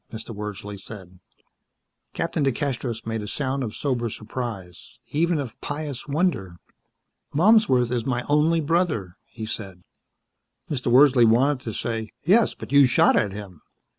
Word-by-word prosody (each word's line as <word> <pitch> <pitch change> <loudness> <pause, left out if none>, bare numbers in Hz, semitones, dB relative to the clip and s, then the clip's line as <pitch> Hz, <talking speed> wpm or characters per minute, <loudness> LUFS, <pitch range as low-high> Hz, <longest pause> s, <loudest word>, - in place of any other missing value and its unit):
Mr. 110 0 -7
Wordsley 105 -1 -6
said. 95 -3 -11 0.9
Captain 165 -2 -1
DeCastros 130 -4 -2
made 110 -1 -3
a 105 - -6
sound 135 +2 -2
of 110 -3 -5
sober 125 -5 -1
surprise. 110 -5 -7
Even 170 +3 +1
of 130 -5 -6
pious 145 -3 -5
wonder. 140 - -1 0.8
"Malmsworth 160 - +4
is 120 -2 0
my 125 -1 -1
only 155 +3 +3
brother," 150 - 0
he 110 -3 -7
said. 95 -5 -7 0.9
Mr. 125 -4 -1
Wordsley 130 -1 +6
wanted 130 +5 +3
to 115 - -3
say, 110 -1 -3
"Yes, 205 +8 +4
but - - -10
you 140 -1 +7
shot 120 - +4
at 100 - +1
him." 95 -5 -9
120 Hz, 140 wpm, -24 LUFS, 105-145 Hz, 0.9 s, you